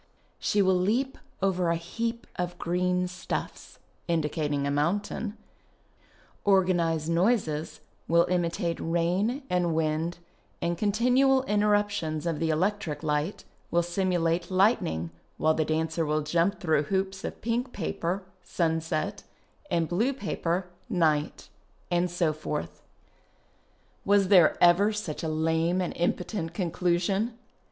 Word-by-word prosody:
She 205 -1 +2
will 185 -1 +3
leap 240 +9 0 0.2
over 185 -3 +2
a 170 - +2
heap 230 +8 -4
of 175 0 -3
green 180 +1 0
stuffs 180 +1 -5 0.3
(indicating 150 -3 0
a 140 - 0
mountain), 200 +8 -1 0.5
" - - -32
Organized 175 -5 +2
noises 165 -3 0
" - - -39
will 170 +1 +4
imitate 170 -1 -1
rain 180 - 0
and 175 -4 +1
wind 160 +2 0 0.4
and 170 0 -1
continual 250 +7 +3
intcrrujitions 205 - +1
of 165 -3 -1
the 165 - 0
electric 180 -1 -1
light 150 +4 -1 0.3
will 175 0 +2
simulate 175 -1 0
ligiitning, 185 - +2 0.3
while 155 0 +3
the 155 - +1
dancer 160 +1 0
will 155 0 0
jump 170 +6 +1
through 160 -5 +2
hoops 190 0 -1
of - - -5
pink 240 +3 -1
paper 185 0 -3 0.2
(sunset) 160 -3 -1 0.5
and 165 -1 +1
blue 225 - +1
paper 185 -7 -2 0.2
(night). 155 -7 +1 0.4
And 175 +1 +2
so 170 -3 +1
forth. 150 -1 -5 1.2
Was 200 -2 +3
there 180 -6 +6
ever 180 +5 +5
such 210 -8 -4
a 160 - -2
lame 160 +3 +1
and 180 - -1
impotent 175 0 -2
conclu 175 -1 +1
sion 205 +6 -1
175 Hz, 130 wpm, -28 LUFS, 160-200 Hz, 1.2 s, there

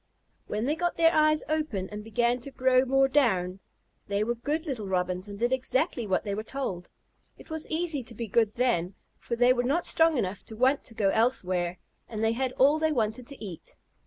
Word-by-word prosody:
When 215 +2 -2
they 290 - +1
got 350 +1 -1
their 330 0 +5
eyes 310 0 +4
open 305 -12 -1
and 210 0 -6
began 235 +3 +1
to 245 - -8
grow 260 -1 +3
more 270 +1 +3
down, 195 -10 +1 0.5
they 200 +1 0
were 235 +2 0
good 295 +7 -3
little 245 - -4
Robins 180 0 -1
and 200 - -7
did 240 +4 +1
exactly 260 - -1
as 185 - +2
they 200 - -3
were 210 - -2
told. 215 -8 -5 0.5
It - - -15
was 315 -1 -4
easy 320 -3 0
to 235 - -9
be 230 - -4
good 220 0 +1
then, 200 -8 0 0.2
for 235 - -3
they 245 +2 +5
were 245 - 0
not 285 +8 0
strong 325 -2 +3
enough 195 -3 -2
to 220 - -9
want 260 +5 +2
to 225 - -8
go 205 -3 +2
elsewhere, 185 -6 0 0.3
and 220 -1 -4
they 225 - +3
had 255 +2 -1
all 290 +4 +4
they 315 0 +1
wanted 230 -2 -1
to 280 -6 -6
eat. 180 -5 -10
240 Hz, 215 wpm, -28 LUFS, 210-275 Hz, 0.5 s, their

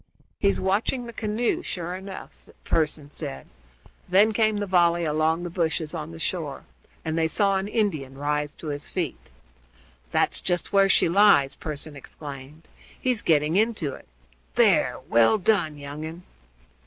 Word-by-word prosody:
"He's 200 -1 +2
watching 210 +6 0
the 235 - -8
canoe, 225 +10 -1
sure 175 - -4
enough," 190 +1 -8
Pearson 150 -2 -1
said. 65 - -6 0.6
Then 205 +4 +5
came 215 -1 +2
the 205 - -1
volley 175 -2 +3
along 155 +2 +1
the 175 - -4
bushes 165 -2 -1
on 160 -2 -5
the 165 - -9
shore, 160 -4 -3 0.4
and 160 0 -1
they 160 - +3
saw 195 +3 +2
an 190 +1 -2
Indian 155 - -1
rise 150 +1 -1
to 155 - -7
his 145 0 -5
feet. 130 - -4 0.8
"That's - - +1
just 175 +2 -2
where 195 0 +5
she - - +4
lies!" 165 -7 +5
Pearson 150 0 -6
exclaimed; 140 +2 -10 0.3
"he's 250 -4 0
getting 155 0 +2
into 210 - +1
it. - - -12 0.5
There! - - +4
well 115 - +5
done, 180 -7 +1
young 145 +1 -7
un." 165 +3 -7
165 Hz, 155 wpm, -25 LUFS, 150-200 Hz, 0.8 s, Then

